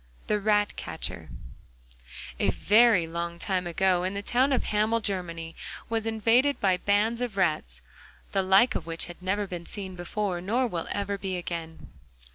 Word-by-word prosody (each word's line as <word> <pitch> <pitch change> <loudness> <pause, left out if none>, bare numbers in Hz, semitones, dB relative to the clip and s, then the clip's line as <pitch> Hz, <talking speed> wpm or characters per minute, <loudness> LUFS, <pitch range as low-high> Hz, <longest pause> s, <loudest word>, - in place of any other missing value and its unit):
THE 210 - +1
RATCATCHER 205 0 -1 1.1
A - - +3
very 215 -4 +4
long 170 +1 -4
time 185 0 -1
ago 180 +1 +1
the 200 +1 -5
town 255 +6 +2
of 260 - +2
Hamel 215 +2 +1
in 230 - -5
Germany 170 -5 -4 0.3
was 225 -1 -1
invaded 230 +6 +2
by 190 -2 +3
bands 210 +5 +1
of 235 -5 -3
rats, 155 - 0 0.5
the 195 - +2
like 195 +7 +5
of - - -4
which 165 0 -2
had 175 +1 -11
never 200 +3 0
been 175 -3 -7
seen 190 -3 -5
before 180 +1 -3
nor 230 +8 +1
will 175 -8 -3
ever 200 0 -2
be 190 -2 -3
again. 165 -2 -6
195 Hz, 160 wpm, -27 LUFS, 175-215 Hz, 1.1 s, like